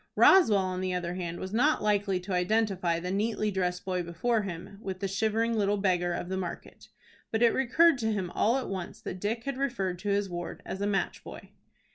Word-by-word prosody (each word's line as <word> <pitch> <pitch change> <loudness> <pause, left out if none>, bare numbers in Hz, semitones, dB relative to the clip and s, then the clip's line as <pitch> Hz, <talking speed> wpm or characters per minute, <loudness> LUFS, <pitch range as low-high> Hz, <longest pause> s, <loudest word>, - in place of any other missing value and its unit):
Roswell, 345 - +6
on 185 -1 -1
the 185 -1 -1
other 175 -1 -2
hand, 175 -2 -4
was 190 +1 -6
not 290 +5 +2
likely 205 -3 +1
to 185 +1 -5
identify 180 -2 +1
the 180 +1 -4
neatly 215 +1 0
dressed 180 -1 -2
boy 185 -1 -1
before 195 +7 0
him 195 +1 -7
with 190 -2 -5
the 195 - -1
shivering 220 +4 0
little 205 -1 +1
beggar 180 -3 +1
of 175 - -3
the 190 +1 -3
market. 180 -2 -7 0.4
But 225 +1 +1
it 235 - +5
recurred 270 +4 +4
to 220 -1 0
him 190 -4 -2
all 230 +7 +2
at 265 - -3
once 185 -3 -5
that 185 - -6
Dick 225 +4 -2
had 275 -1 -4
referred 195 -10 -1
to 205 +2 -3
his 200 0 +1
ward 175 -1 -6
as 190 - -5
a 200 - +1
match 200 -1 -1
boy. - - -10
195 Hz, 215 wpm, -29 LUFS, 180-220 Hz, 0.4 s, Roswell